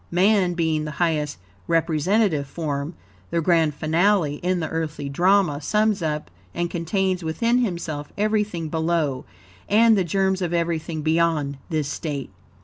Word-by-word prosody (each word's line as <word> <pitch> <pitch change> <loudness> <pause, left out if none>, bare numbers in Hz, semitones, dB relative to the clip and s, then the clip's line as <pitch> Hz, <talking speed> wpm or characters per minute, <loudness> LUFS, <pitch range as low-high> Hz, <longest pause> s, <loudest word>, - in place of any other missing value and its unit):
Man 185 0 +3
being 160 -2 0
the - - -4
highest 155 - 0 0.3
representative 165 0 +1
form 145 +1 -4 0.3
the 170 - 0
grand 165 -3 +2
finale 160 -1 +2
in 180 +2 -1
the 160 - -2
earthly 150 -3 -3
drama 175 0 +2
sums 210 +4 +1
up 150 - -3 0.2
and 175 0 -1
contains 185 +2 -1
within 230 +10 +1
himself 170 -9 -3
everything 210 -5 0
below, 160 -4 -1 0.4
and 225 +2 +5
THE 195 - +2
GERMS 190 +2 0
OF 175 -1 -1
EVERYTHING 165 -2 -2
BEYOND, 160 -3 +1
THIS 155 -3 -1
STATE. 145 - -4
165 Hz, 140 wpm, -23 LUFS, 155-190 Hz, 0.4 s, and